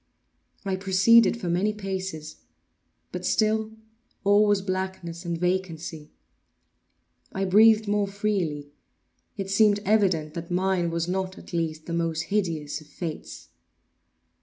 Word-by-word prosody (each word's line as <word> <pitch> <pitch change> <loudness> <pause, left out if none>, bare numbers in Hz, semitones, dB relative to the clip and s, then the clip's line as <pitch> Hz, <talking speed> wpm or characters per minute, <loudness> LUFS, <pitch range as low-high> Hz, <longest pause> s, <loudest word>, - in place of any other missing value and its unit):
I 190 -1 -1
proceeded 200 +5 +4
for 185 - -5
many 185 +5 +1
paces; 190 -6 -5 0.7
but 180 0 -5
still 220 +2 +1 0.5
all 205 +1 +5
was 205 -2 +2
blackness 185 -2 -4
and 170 -1 -2
vacancy. 170 -3 -3 1.2
I 195 0 -2
breathed 215 +3 +5
more 205 0 +1
freely. 190 -8 -2 0.7
It 195 -1 -4
seemed 205 0 +4
evident 185 -8 +2
that 170 0 -6
mine 180 -1 +1
was 165 0 -2
not, 190 +1 -2
at - - -13
least, 160 -2 -2
the 170 - -5
most 165 -1 -1
hideous 160 -7 -1
of 155 - -16
fates. 160 0 -7
185 Hz, 125 wpm, -26 LUFS, 170-205 Hz, 1.2 s, all